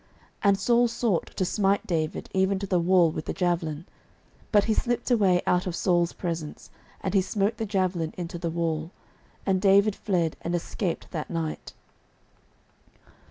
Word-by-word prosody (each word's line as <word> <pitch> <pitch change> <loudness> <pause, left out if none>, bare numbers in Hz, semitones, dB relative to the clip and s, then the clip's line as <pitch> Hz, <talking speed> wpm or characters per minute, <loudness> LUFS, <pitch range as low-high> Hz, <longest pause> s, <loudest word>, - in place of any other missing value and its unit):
09:019:010 - - -33 0.4
And 195 -1 +3
Saul 240 +4 +3
sought 230 -6 0
to 185 - +1
smite 200 +1 +1
David 160 -3 -2
even 190 +1 +2
to 200 - -4
the 185 -2 +1
wall 175 -1 +4
with 155 - -5
the - - -3
javelin: 170 -3 -1 0.7
but 205 -2 +5
he 220 - +1
slipped 240 +2 -1
away 190 -6 +3
out 180 +1 +1
of 175 - -3
Saul's 175 -2 +2
presence, 165 -4 -5 0.3
and 190 - -2
he 195 - +4
smote 200 +2 -1
the 225 - -3
javelin 185 -5 0
into 175 0 -5
the 170 -1 -2
wall: 160 -1 -2 0.6
and 190 -1 +1
David 200 +1 +4
fled, 175 -6 -1
and 170 +1 -2
escaped 175 +1 -3
that 155 -4 -4
night. 165 -2 -4
185 Hz, 165 wpm, -26 LUFS, 170-200 Hz, 0.7 s, but